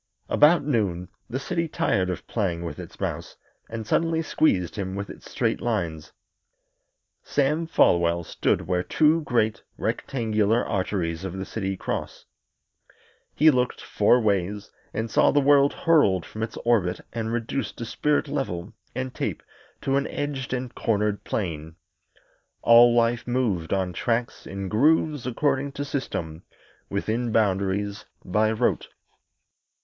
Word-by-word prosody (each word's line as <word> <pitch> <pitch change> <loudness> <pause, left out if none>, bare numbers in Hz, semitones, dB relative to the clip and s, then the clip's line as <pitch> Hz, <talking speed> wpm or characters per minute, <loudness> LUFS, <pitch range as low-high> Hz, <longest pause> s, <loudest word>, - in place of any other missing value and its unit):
About 155 +4 +5
noon 100 - 0 0.2
the 120 - -2
city 165 +5 -2
tired 95 - 0
of 90 - -4
playing 90 -6 -2
with 85 - -6
its - - -10
mouse - - -4 0.3
and 115 -1 -5
suddenly 165 +7 +1
squeezed 95 - +1
him 95 -2 -4
with 100 0 -5
its - - -13
straight - - -1
lines. 85 -10 -2 1.1
Sam 150 +4 0
Folwell 85 - +3
stood - - 0
where 90 +1 0
two 155 - +3
great, 110 -7 0 0.2
rectangular 110 -2 0
arteries 95 -4 -2
of 95 -1 -5
the 95 - -4
city 95 -3 -3
cross. - - -4 1.1
He 155 +2 +6
looked 125 -2 0
four 110 +4 +3
ways, 100 -2 -1 0.2
and 110 +1 -2
saw - - +4
the 145 - +3
world 140 0 +5
hurled 105 - +3
from 110 - -8
its 110 - -4
orbit 100 -7 +2
and 115 -1 -3
reduced 120 +3 -3
by 120 - -5
spirit 150 +6 0
level 90 -9 -3 0.2
and 130 0 -3
tape - - -3 0.4
to 135 0 +1
an 140 - 0
edged 145 -2 -4
and 125 -1 -3
cornered 105 -2 0
plane. 80 -5 -4 0.9
All 120 +1 +7
life 120 0 +2
moved 115 -10 0
on 95 -2 0
tracks, 115 +6 -2
in 95 0 -5
grooves, 145 - +2
according 135 +2 0
to 145 - -4
system, 85 - -4 0.5
within 110 +4 -1
boundaries, 100 -1 0 0.2
by 105 +4 +2
rote. 115 +2 0
110 Hz, 140 wpm, -25 LUFS, 95-135 Hz, 1.1 s, All